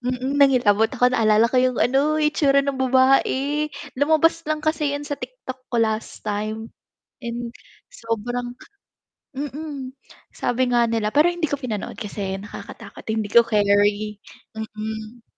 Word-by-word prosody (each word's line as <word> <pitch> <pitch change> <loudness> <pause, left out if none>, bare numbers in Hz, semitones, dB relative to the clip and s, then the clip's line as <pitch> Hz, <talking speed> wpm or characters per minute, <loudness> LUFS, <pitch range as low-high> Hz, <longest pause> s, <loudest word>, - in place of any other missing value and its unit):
Mm, 255 +3 -2
nangilabot 225 -6 +4
ako, 250 -1 +2
naalala 220 -1 +4
ko 255 - +2
yung 255 -1 +1
ano, 280 +5 +2
itsura 290 -2 +3
ng 275 -2 -2
babae. 270 +3 +2 0.3
Lumabas 315 +4 +3
lang 310 0 -2
kasi 305 -2 +1
'yon 290 0 -4
sa 285 -1 -4
TikTok 260 - -9
ko 240 - -2
last 220 -1 -1
time, 215 +2 -3 0.5
and 235 0 -4 0.4
sobrang 245 - -4 0.8
mm. 285 -1 -5 0.4
Sabi 245 +1 -1
nga 240 -1 +3
nila, 225 -2 0
pero 305 +4 +5
hindi 345 -4 -2
ko 285 - -1
pinanood 230 -7 -5
kasi 195 -2 -4
nakakatakot, 205 - -10
hindi 220 -1 -1
ko 235 +3 +6
keri. 205 0 +2 0.4
Mm. 220 +1 -7
250 Hz, 135 wpm, -22 LUFS, 220-285 Hz, 0.8 s, ko